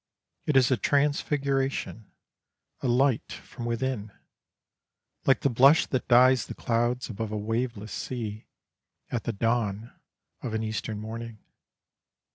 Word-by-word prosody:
It 150 - +3
is 130 0 +4
a 130 - +3
transfiguration, 140 -3 0 0.7
a - - -1
light 125 0 +2
from 120 - -8
within, 115 -3 -2 1.2
like 135 - +4
the 140 - +2
blush 135 +6 +6
that 130 - -2
dyes 125 +1 +5
the - - -7
clouds 120 +1 0
above 110 -1 -5
a 105 - -2
waveless 110 0 -3
sea, 110 -4 -5 0.6
at 120 - -2
the 120 - 0
dawn 115 0 -1 0.5
of 115 -3 -3
an 110 - -1
Eastern 110 0 -3
morning. 115 +1 -7
120 Hz, 125 wpm, -27 LUFS, 110-130 Hz, 1.2 s, blush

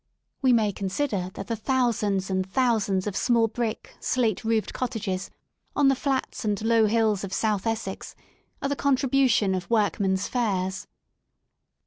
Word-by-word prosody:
We 260 -2 +4
may 220 -4 +3
con 195 0 -4
sider 195 -5 -1
that - - -6
the 230 - -2
thousands 215 -5 0
and 190 0 +1
thousands 215 -6 +1
of 205 -2 -3
small 235 -2 +3
brick, 225 0 -4
slate 235 -4 0
roofed 225 -1 0
cottages 200 -7 -3 0.5
on 285 -2 +4
the 270 - +3
flats 270 0 -2
and 205 -2 0
low 225 -1 +4
hills 215 -2 +2
of 195 - -5
south 215 0 0
Essex 220 -4 -4 0.5
are 275 - 0
the 285 - 0
contribution 265 -7 +2
of 185 -1 -3
workmen's 200 -3 +1
fares." 190 -6 -1
220 Hz, 150 wpm, -26 LUFS, 195-245 Hz, 0.5 s, We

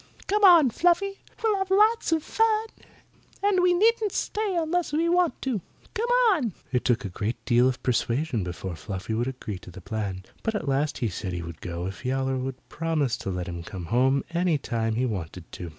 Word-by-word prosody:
Come 415 +1 +1
on, 335 -9 +8
Fluffy. 360 - +2 0.2
We'll 430 -3 +2
have 385 0 -2
lots 425 +1 +4
of 320 -2 +2
fun. 445 0 +1 0.7
And 400 -2 +3
we 360 0 +4
needn't 430 +2 +3
stay 420 -3 -1
unless 335 +2 0
we 320 +3 +1
want 350 -1 +2
to. 250 -8 -1 0.3
Come 470 +1 -1 0.2
on!" 260 - 0 0.2
It 125 -1 +1
took 120 -2 +1
a - - -3
great 105 +6 -3
deal 120 +1 +4
of 130 - -5
persuasion 125 - 0
before 90 0 -5
Fluffy 95 +3 -5
would 120 +3 0
agree 120 -7 -5
to - - -12
the 90 +2 -10
plan, 95 -1 -4 0.2
but 225 -1 -1
at 165 -8 -3
last 140 +2 0
he 120 - 0
said 95 -1 -4
he 85 -1 -3
would 85 -1 -9
go 85 0 -4
if 95 +2 -6
Yowler 130 +1 0
would 130 0 -5
promise 155 -6 0
to - - -5
let 90 -1 -3
him 85 -1 -5
come 90 +1 -7
home 130 +3 +3
any 170 -2 +2
time 115 -4 -2
he 125 +3 +1
wanted 90 -6 -4
to. 90 - -7
135 Hz, 205 wpm, -26 LUFS, -, 0.7 s, on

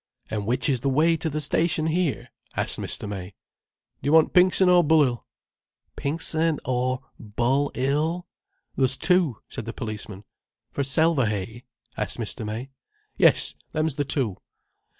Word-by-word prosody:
"And 105 -2 -3
which 125 +2 +2
is 130 -3 +1
the 135 +3 -1
way 155 +5 +3
to 160 - -2
the 155 0 -3
station 160 +2 +1
here?" 160 -6 -1 0.3
asked - - -1
Mr. - - -4
May. 95 -2 -7 0.7
"Do - - -4
yer - - +2
want 160 -1 +5
Pinxon 185 +1 +5
or 180 -1 +6
Bull'ill?" 145 -6 +2 0.7
"Pinxon 160 +1 0
or 130 +1 -1 0.2
Bull'ill?" 140 +8 0 0.5
"There's 135 0 +2
two," 180 -9 +2
said - - -7
the 115 - -5
policeman. 105 -2 -6 0.5
"For 140 - -1
Selverhay?" 125 - 0 0.3
asked 105 - 0
Mr. 115 0 -3
May. 110 +5 -5 0.4
"Yes, - - +4 0.2
them's 155 -1 0
the 145 +1 -1
two." 130 -8 -1
135 Hz, 140 wpm, -25 LUFS, 115-160 Hz, 0.7 s, or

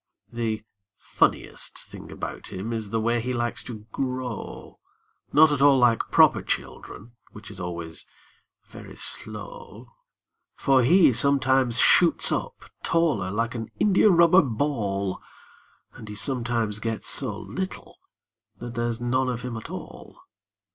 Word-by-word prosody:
The 110 -2 -2 0.3
funniest - - -1
thing - - -10
about - - -7
him 100 +5 -5
is 110 -3 -4
the 115 - -1
way 115 +1 0
he 125 +2 -3
likes 120 0 -2
to 110 -3 -8
grow— 125 -3 -5 0.5
Not 155 +1 +6
at 145 -2 0
all 140 -1 +6
like 120 -3 +2
proper - - +5
children, 115 +4 -5 0.2
which 105 +1 -11
is 100 - -9
always 85 -2 -6 0.6
very - - -12
slow; 485 -2 -4 0.7
For 135 -2 +3
he 165 +3 +5
sometimes 130 -1 +3
shoots 170 +4 +5
up - - -3 0.2
taller 150 - +1
like 115 +4 -2
an 115 -2 -6
india 210 +1 +4
rubber 170 0 +6
ball, 110 -7 -2 0.7
And 110 - -11
he 105 - -7
sometimes 115 -2 -1
gets 115 0 -3
so 115 -7 0
little 190 0 -7 0.6
that 120 +1 -8
there's 120 -1 -2
none 130 +2 0
of 120 -1 -4
him 125 -2 -5
at 110 - -8
all. - - -10
120 Hz, 135 wpm, -25 LUFS, 110-135 Hz, 0.7 s, Not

